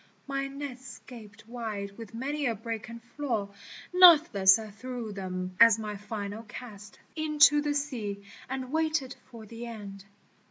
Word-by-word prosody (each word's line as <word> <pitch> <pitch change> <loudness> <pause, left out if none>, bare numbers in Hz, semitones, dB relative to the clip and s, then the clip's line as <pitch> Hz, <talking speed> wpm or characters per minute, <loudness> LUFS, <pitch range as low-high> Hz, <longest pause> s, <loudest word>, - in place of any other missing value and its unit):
" - - -36
My 275 0 -2
nets 275 -2 -8
gaped 215 -4 -13
wide 215 -4 -5
with 225 -1 -10
many 280 +4 -2
a 230 - 0
break 225 +1 -6
and 230 0 -10
flaw 240 -5 -3 0.4
Nathless 305 - +7
I 220 -1 -8
threw 235 +1 -6
them 185 -1 -5
as 230 -2 +8
my 210 -1 -5
final 205 +1 -6
cast 210 -3 -11 0.2
Into 300 -2 +5
the 290 0 -1
sea, 225 -9 -3 0.3
and 260 -1 -4
waited 310 -4 0
for 230 -3 -11
the 230 +2 -8
end. 200 -4 -9
230 Hz, 155 wpm, -29 LUFS, 205-275 Hz, 0.4 s, as